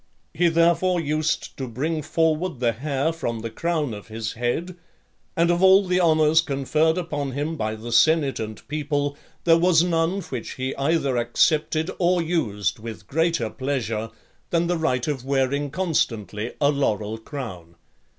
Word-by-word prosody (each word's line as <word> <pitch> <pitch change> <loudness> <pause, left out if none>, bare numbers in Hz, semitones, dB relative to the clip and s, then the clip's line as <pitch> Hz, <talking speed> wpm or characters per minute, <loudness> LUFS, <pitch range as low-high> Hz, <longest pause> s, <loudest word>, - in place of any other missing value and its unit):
He 175 +1 +3
therefore 170 +2 +3
used 155 0 -1
to 130 - -4
bring 155 +7 -2
forward 160 0 0
the 120 -2 +2
hair 140 +6 -1
from 115 -8 -3
the 115 0 -5
crown 155 -1 -1
of 105 -1 -9
his 110 0 -4
head; 125 +10 -2 0.6
and 170 +1 +4
of 175 +1 +1
all 190 +1 +6
the 180 0 +2
honours 160 -1 +4
conferred 155 +3 +1
upon 145 -6 -3
him 150 +4 -2
by 110 -6 -2
the 115 +2 -8
senate 150 +2 +3
and 110 -1 -6
people, 145 -1 -1 0.3
there 165 -1 +5
was 170 -1 +4
none 175 +2 0
which 125 -9 -6
he 130 +1 -3
either 140 -2 +1
accepted 155 +7 +1
or 180 0 +3
used 140 - -1
with 110 0 -8
greater 160 -7 0
pleasure, 115 -5 -2 0.4
than 170 0 +1
the 175 0 0
right 130 -6 0
of 140 -5 -2
wearing 140 +1 0
constantly 120 - -1
a 145 0 +4
laurel 110 -6 -1
crown. 110 - -8
145 Hz, 160 wpm, -24 LUFS, 120-165 Hz, 0.6 s, all